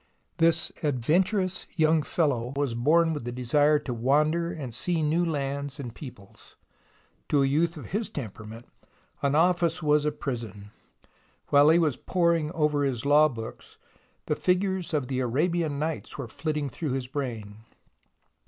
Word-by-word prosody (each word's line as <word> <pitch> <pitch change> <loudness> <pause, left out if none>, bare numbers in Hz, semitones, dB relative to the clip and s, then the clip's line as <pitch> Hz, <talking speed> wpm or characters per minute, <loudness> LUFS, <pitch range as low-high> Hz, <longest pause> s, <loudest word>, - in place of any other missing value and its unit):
This 165 0 +3
adventurous 175 - 0
young 160 -1 +3
fellow 135 -6 -1
was 140 -4 -1
born 160 +8 +3
with 150 - -5
the 120 - -4
desire 145 +5 +3
to 130 -3 -5
wander 150 +8 +1
and 135 -8 -6
see 170 +5 0
new 160 +4 +2
lands 140 -2 -3
and 120 -5 -6
peoples. 120 -8 -12 0.7
To 145 -2 +3
a - - +3
youth 160 +5 +1
of 150 - -9
his 210 +2 -2
temperament, 115 - -8 0.5
an 140 0 +1
office 170 0 +2
was 150 0 +3
a 150 - +1
prison. 115 -8 -6 0.8
While 145 +1 +6
he 165 - +6
was 155 -6 +1
poring 170 -4 +1
over 150 -3 +1
his 135 -2 -2
law 150 +2 +5
books, 115 -4 -9 0.5
the - - 0
figures 185 0 0
of 140 -4 -1
the 130 -1 -2
Arabian 150 +5 0
Nights 155 +2 -3
were 140 -4 -5
flitting 150 +3 -3
through 140 +2 -4
his 130 -1 -2
brain. 120 -6 -5
150 Hz, 155 wpm, -27 LUFS, 125-165 Hz, 0.8 s, While